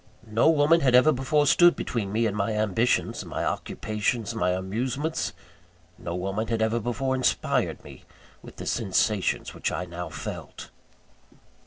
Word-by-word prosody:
No 115 +7 +3
woman 160 +1 +4
had 130 -3 +4
ever 130 +5 +6
before 145 +2 +1
stood 175 +5 +6
between 105 -5 -3
me 115 +2 +1
and 105 -2 -1
my 105 +1 -1
ambitions, 110 +3 0
my - - -4
occupations, 110 +1 -2
my 90 - 0
amusements. 120 - -2 0.7
No 85 - -5
woman 95 +5 -2
had 115 0 -1
ever 110 +1 +1
before 125 +4 -2
inspired 130 -1 0
me - - -13 0.4
with - - -13
the - - -8
sensations 105 -2 0
which - - -2
I 90 - -3
now 90 -1 -6
felt. - - -8
115 Hz, 150 wpm, -26 LUFS, 100-130 Hz, 0.7 s, ever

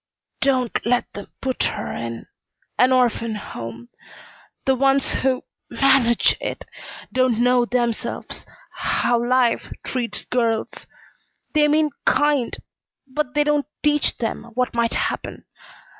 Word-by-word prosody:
"Don't 255 -3 +1
let 245 +2 0
them 205 - -8
put 260 -1 -2
her 205 - -3
in 115 0 -5 0.5
an 255 +1 +5
orphan 235 -3 +2
home. 115 - -8 0.8
The 265 - +4
ones 270 +1 +2
who 260 -1 0 0.3
manage 265 -4 +4
it - - -4 0.5
don't 255 -3 +2
know 245 0 +3
themselves 240 -2 -2 0.2
how 240 -1 +1
life 245 -1 +2
treats 245 -3 -2
girls. 230 -3 -1 0.7
They 300 -1 +4
mean 305 0 +3
kind 290 -5 +2 0.5
but 275 0 -3
they 295 - +4
don't 295 -1 +1 0.2
teach 295 0 +3
them 230 0 -3
what 250 0 0
might 235 -1 +1
happen. - - -3
250 Hz, 120 wpm, -22 LUFS, 235-275 Hz, 0.8 s, an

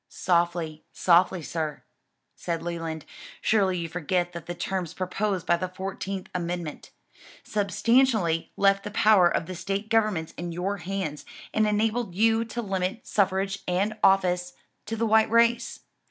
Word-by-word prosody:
"Softly, 170 -3 0
softly, 175 0 +3
sir," 155 -2 -4 0.5
said 165 -1 -3
Leland, 165 -2 -4 0.3
"surely 195 -4 +2
you 170 -1 -3
forget 175 +1 -1
that 170 -2 -8
the 175 - -4
terms 180 -2 -3
proposed 185 0 -2
by 175 - +3
the 185 +2 -3
fourteenth 190 +1 -5
amendment, 175 -3 -4 0.5
substantially 210 -4 +2
left 195 0 +3
the - - -5
power 205 -3 +5
of 170 - -1
the 185 - -6
State 195 +4 -3
governments 215 -8 +1
in 175 0 -4
your 185 +4 -2
hands, 180 -5 -4 0.3
and 215 0 +3
enabled 215 -1 0
you 225 +2 +3
to 235 +1 -5
limit 190 +2 -2
suffrage 195 0 0
and 195 +4 0
office 180 -2 +3 0.3
to 225 - -2
the 225 +1 0
white 220 0 +4
race. 230 +1 +2
185 Hz, 145 wpm, -26 LUFS, 175-210 Hz, 0.5 s, power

